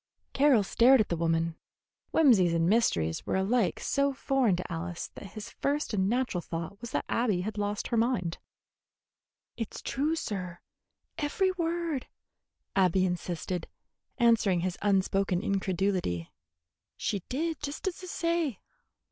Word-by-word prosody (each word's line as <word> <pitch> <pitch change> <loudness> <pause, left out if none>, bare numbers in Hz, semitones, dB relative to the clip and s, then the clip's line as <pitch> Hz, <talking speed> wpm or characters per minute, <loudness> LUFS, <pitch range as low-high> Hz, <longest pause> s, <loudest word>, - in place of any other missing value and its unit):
Carroll 270 -6 +5
stared 250 +6 +5
at 215 - +1
the 170 - +1
woman. 165 0 0 0.5
Whimsies 205 - +5
and 165 0 +2
mysteries 85 - +2
were - - 0
alike 195 +3 +1
so 280 0 +1
foreign 265 -7 +2
to 180 0 -5
Alice 170 +1 -4
that 195 - -10
his 215 +1 -7
first 290 -2 -1
and 190 -1 +2
natural 240 -6 0
thought 165 +4 -6
was 235 - -6
that - - -2
Abby 220 -7 +1
had 215 +3 -4
lost 205 0 -2
her 235 - +1
mind. 225 -8 0 1.2
"It's 225 -3 -5
true, 300 +4 -1
sir, 185 - -4 0.6
every 375 +6 +1
word," 335 -5 -2 0.7
Abby 185 -1 +4
insisted, 175 -1 -3 0.5
answering 220 -7 +3
his 180 0 -1
unspoken 195 -1 +1
incredulity. 190 - -1 0.7
"She 205 - -1
did 315 +4 -2
just 290 +6 -5
's 375 -1 -3
I - - -6
say." 335 - -1
205 Hz, 140 wpm, -29 LUFS, 180-270 Hz, 1.2 s, Carroll